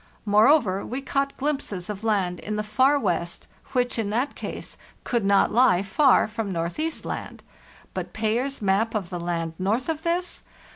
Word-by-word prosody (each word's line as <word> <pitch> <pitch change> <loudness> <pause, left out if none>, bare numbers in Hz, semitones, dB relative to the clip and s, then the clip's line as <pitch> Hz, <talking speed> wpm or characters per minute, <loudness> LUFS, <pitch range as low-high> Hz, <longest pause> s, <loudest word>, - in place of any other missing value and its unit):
Moreover, 210 -1 +4
we 255 - -4
caught 275 0 -1
glimpses 270 -11 -2
of 210 0 -6
land 195 -5 0
in 210 - -4
the 210 - -1
far 260 +7 +3
west 170 -9 -2 0.3
which 245 -2 +1
in 210 -3 -1
that 245 +7 0
case - - -6 0.3
could 235 -3 0
not 200 0 +4
lie 210 -6 +4
far 260 +7 +4
from 220 -2 -4
Northeast 180 - -2
Land. - - -6 0.5
But - - -4
Payer's 230 +4 -1
map 205 +4 +1
of 195 -5 -2
the 175 - -3
land 170 -1 -2
north 215 - 0
of 320 -1 -2
this? 345 +2 -1
220 Hz, 165 wpm, -25 LUFS, 195-270 Hz, 0.5 s, Moreover